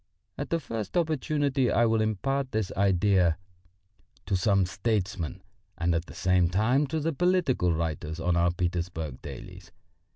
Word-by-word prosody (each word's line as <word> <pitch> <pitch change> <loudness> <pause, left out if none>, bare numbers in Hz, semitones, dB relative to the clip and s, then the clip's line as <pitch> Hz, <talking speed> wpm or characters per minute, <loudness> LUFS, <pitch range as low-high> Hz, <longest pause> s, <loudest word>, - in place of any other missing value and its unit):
At - - -5
the 165 - +1
first 115 - -4
opportunity 145 -4 +1
I 120 - +3
will 110 -1 +2
impart 130 +6 -1
this 110 -3 -1
idea 95 -3 +3 0.9
to 100 - 0
some 100 0 +3
statesman 95 -2 -2 0.3
and 85 0 +1
at 85 +1 -1
the - - -11
same 90 -2 +2
time 120 +10 +2
to 160 +3 -2
the 160 +2 -1
political 175 - +2
writers 80 0 -3
on 85 +1 +1
our 85 0 +3
Petersburg 85 -5 -3
dailies. - - -10
100 Hz, 150 wpm, -28 LUFS, 85-130 Hz, 0.9 s, I